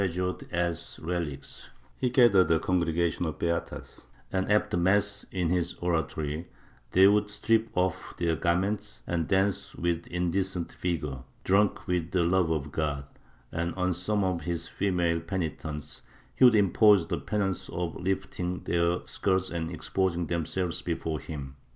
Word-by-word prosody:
30 100 - +3
MYSTICISM 90 - +1
[Book 90 - -2
VIII - - -12
ured - - -18
as 85 -1 -2
relics; 80 -5 -4 0.3
he 125 - 0
gathered 120 -7 +5
a 80 -1 +4
congregation 85 -1 +1
of 80 - -4
beatas 85 0 -3 0.3
and, 95 +1 0
after 105 -3 +2
mass 100 +3 +2
in 90 -3 0
his 90 -1 0
oratory, 80 -2 -2 0.4
they 95 +8 +6
would 105 +1 +3
strip 110 +2 +1
off 90 -1 -1
their 85 -2 +1
garments 95 +6 -1
and 85 -2 -1
dance 95 0 +1
with 85 0 -1
indecent 90 0 -1
vigor 75 -7 -3
— - - -34
drunk 100 +2 +2
with 90 -3 -1
the 90 -1 +2
love 90 0 +2
of 75 -3 -1
God 70 -2 -2 0.3
— - - -31
and, 85 +1 -2
on 90 -1 +1
some 100 +4 0
of 90 -3 0
his 85 -1 -3
female 90 -4 0
penitents, 80 -4 -4 0.3
he 130 - +5
would 120 -2 +7
impose 105 -2 +5
the - - -2
penance 100 -3 -2
of 85 -2 -3
lifting 90 -1 -2
their 85 0 +1
skirts 95 -1 0
and 85 -1 -2
exposing 85 +1 -1
themselves 85 +2 -2
before 80 -2 -2
him. 70 -4 -7
90 Hz, 165 wpm, -28 LUFS, 85-95 Hz, 0.4 s, would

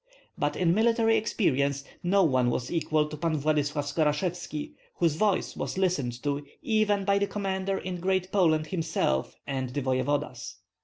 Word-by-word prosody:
But - - -1
in 170 -2 +2
military 225 +1 +3
experience 140 - +1 0.2
no 195 +2 +3
one 130 -6 +3
was 120 0 -2
equal 155 -2 +1
to 150 - -7
Pan 155 +1 -1
Vladyslav 150 0 0
Skorashevski, 155 +2 -1 0.2
whose 170 -3 +2
voice 200 +4 0
was - - -4
listened 145 -11 0
to 145 0 -1 0.2
even 210 -3 +2
by 200 0 +3
the 200 - +1
commander 195 -1 -2
in 180 -1 -5
Great 185 +1 0
Poland 160 -6 +3
himself 155 - -1
and 130 -2 -3
the 140 +3 -3
voevodas. 130 +3 -1
160 Hz, 155 wpm, -28 LUFS, 145-190 Hz, 0.2 s, military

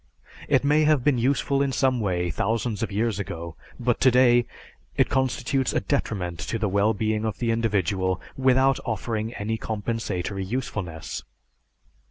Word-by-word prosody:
It - - +3
may 150 +2 +4
have 150 -4 +3
been 140 -3 +3
useful 140 +2 +1
in 140 -1 +1
some 130 -1 +2
way 90 -4 -1
thousands 110 +5 -1
of 115 - -2
years 105 0 0
ago, 85 -4 -5 0.2
but 120 -1 0
today 125 -2 +5 0.5
it - - +3
constitutes 130 0 0
a - - +2
detriment 90 -4 -2
to 100 - -3
the 110 -1 0
well 100 +3 +2
being 110 +1 -1
of 110 -3 -2
the 115 -2 0
individual 100 -5 0 0.2
without 130 0 +3
offering 110 0 -2
any 110 +2 -3
compensatory 105 -4 -3
usefulness. 95 -7 -4
110 Hz, 150 wpm, -25 LUFS, 100-125 Hz, 0.5 s, today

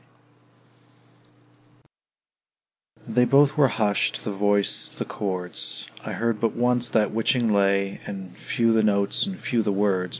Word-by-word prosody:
They 125 +2 +2
both 140 +3 +4
were 145 -2 +5
husht, 105 -5 0
the 105 - -3
voice, 100 0 0
the - - -3
chords, 90 -3 -4 0.2
I - - -5
heard 115 -2 -1
but 115 0 0
once 120 0 +1
that 105 -3 +1
witching 115 0 +1
lay; 100 -1 +1
And 95 -3 -8
few 115 -1 0
the 110 - +3
notes, 100 - +1
and 190 -1 -5
few 120 -2 0
the 105 - -1
words. 95 -2 0
105 Hz, 135 wpm, -24 LUFS, 100-120 Hz, 0.2 s, were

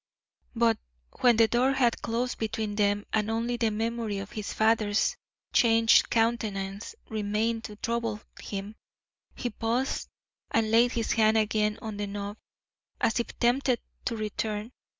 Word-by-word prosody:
But 230 -1 +3 0.4
when 240 -3 +5
the 225 -1 +6
door 250 +4 +2
had 245 -3 +2
closed 240 +2 -2
between 220 -1 -2
them 205 0 +1
and 215 0 +1
only 230 +2 0
the 230 -2 +2
memory 225 -1 -2
of 195 0 -6
his 215 -2 -5
father's 220 -1 +2 0.4
changed 225 -2 +5
countenance 210 -3 -1
remained 220 +2 -1
to 210 - -8
trouble 230 -1 -2 0.2
him, 200 +1 -5 0.6
he 245 - -3
paused 235 +5 -1 0.4
and 220 -1 +1
laid 235 +2 +5
his 230 -2 -1
hand 220 -1 +4
again 215 0 +1
on 215 -2 -5
the 205 0 -2
knob, 200 +1 -5 0.6
as 230 - +2
if 235 - -4
tempted 245 +1 +2 0.3
to 235 - -1
return. 215 +1 -3
225 Hz, 145 wpm, -28 LUFS, 210-235 Hz, 0.6 s, the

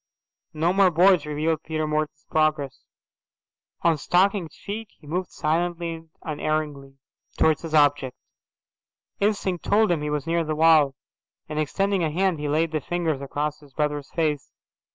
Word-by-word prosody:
No 165 +3 +2
more 195 -1 +5
boards 175 -2 +4
revealed 155 +1 -1
Peter 155 -1 -2
Morton's 150 -1 -2
progress. 155 -3 0 1.0
On 165 -3 +3
stockinged 185 +1 +1
feet 215 +2 -6
he - - -20
moved 180 +4 -3
silently 170 +2 -1
and 165 0 -11
unerringly 150 -3 -3 0.4
towards 160 -1 +3
his 160 -2 -3
object. 145 -3 +3 1.0
Instinct 200 -3 0
told 215 -1 +3
him 165 -4 +1
he 150 - -2
was 150 -2 -2
near 170 0 +1
the 155 -1 -2
wall, 155 -3 +5 0.5
and, 150 0 -3
extending 195 +5 0
a 160 - +1
hand, 180 +1 0
he 150 0 -2
laid 160 +2 +1
the 155 -2 -1
fingers 165 -3 -2
across 145 +2 -3
his 145 -3 -19
brother's 150 -2 -1
face. 155 -4 -1
155 Hz, 155 wpm, -24 LUFS, 150-175 Hz, 1.0 s, more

